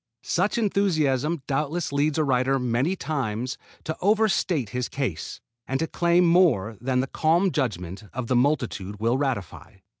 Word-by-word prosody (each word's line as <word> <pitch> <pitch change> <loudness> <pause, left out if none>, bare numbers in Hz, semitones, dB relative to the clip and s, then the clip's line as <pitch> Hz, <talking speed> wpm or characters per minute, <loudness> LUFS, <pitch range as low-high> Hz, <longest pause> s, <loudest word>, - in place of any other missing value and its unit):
Such 195 +7 0
enthusiasm 165 - +1
doubtless 150 +3 -2
leads 145 +1 +1
a 155 - +3
writer 135 -1 +2
many 125 +7 0
times 130 - -3 0.2
to 160 - -3
over 215 +3 +4
state 170 - 0
his 125 +1 -3
case, 130 - -4 0.3
and 135 +1 -1
to 160 - +1
claim 170 +2 +2
more 165 - +3
than 130 0 +1
the - - -1
calm 170 +7 +2
judgment 100 - -3
of 125 0 -4
the 125 - 0
multitude 120 -7 0
will 115 +4 +1
ratify. 130 -11 -3
135 Hz, 155 wpm, -25 LUFS, 125-170 Hz, 0.3 s, over